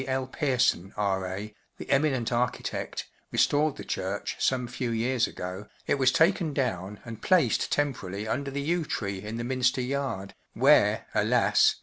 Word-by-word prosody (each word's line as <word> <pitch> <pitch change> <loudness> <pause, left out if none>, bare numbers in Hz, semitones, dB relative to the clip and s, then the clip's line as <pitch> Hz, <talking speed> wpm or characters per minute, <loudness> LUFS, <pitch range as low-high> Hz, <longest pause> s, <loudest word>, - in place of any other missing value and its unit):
L, 130 0 0
Pearson, 125 - 0
R,A*, 100 +1 -2 0.2
the - - -8
eminent 135 -4 +2
architect, 120 +1 -2 0.3
restored 150 0 +2
the - - -8
church 95 +2 -3
some 125 -2 +1
few 120 0 -3
years 115 +1 +1
ago, 90 +3 -6 0.2
it 140 - +1
was 130 -1 +5
taken 160 -2 +2
down 105 -6 -2
and 115 -2 -8
placed 170 - +3
tem¬ 145 -1 +2
pt - - -14
jrarily 100 +3 -5
under 140 +5 -2
the 140 +1 -3
yew 170 +3 +1
tree 100 -9 -3
in 105 +3 -5
the 120 - -3
Minster 130 +1 +1
yard, 125 -7 -3 0.2
where, - - +4
alas! - - +4
125 Hz, 160 wpm, -28 LUFS, 105-140 Hz, 0.3 s, was